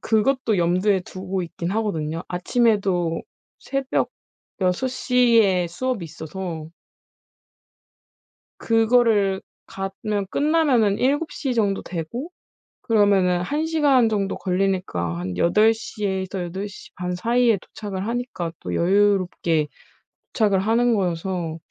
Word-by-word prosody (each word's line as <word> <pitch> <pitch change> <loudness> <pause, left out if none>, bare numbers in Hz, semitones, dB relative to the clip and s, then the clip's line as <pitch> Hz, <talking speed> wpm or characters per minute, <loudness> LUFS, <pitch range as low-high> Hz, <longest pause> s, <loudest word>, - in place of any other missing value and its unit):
그것도 225 0 +1
염두에 185 +3 +2
두고 185 +1 -4
있기는 170 +2 -4
하거든요. 165 -7 -2
아침에도 185 -4 +1 0.4
새벽 275 -1 -1 0.5
6 185 +7 +1
시에 235 -8 +3
수업이 215 +4 -3
있어서 160 0 -6 1.9
그거를 225 -4 +3 0.3
가면 195 +1 -3
끝나면은 280 -10 +2
7:00 280 -1 0
정도 205 -4 +1
되고 185 - -5 0.5
그러면은 200 -5 +3
1 295 - -1
시간 290 -7 +3
정도 200 -2 -1
걸리니까 180 - -1
한 90 0 -4
8:00 215 - +2
에서 190 -1 -2
8:30 180 -1 -6
사이에 235 +3 +3
도착을 195 +1 -6
하니까 235 -8 -3
또 90 - -4
여유롭게 185 - +2 0.7
도착을 205 -4 +2
하는 230 +3 +2
거여서 175 -3 -2
195 Hz, 220 characters per minute, -23 LUFS, 180-230 Hz, 1.9 s, 시에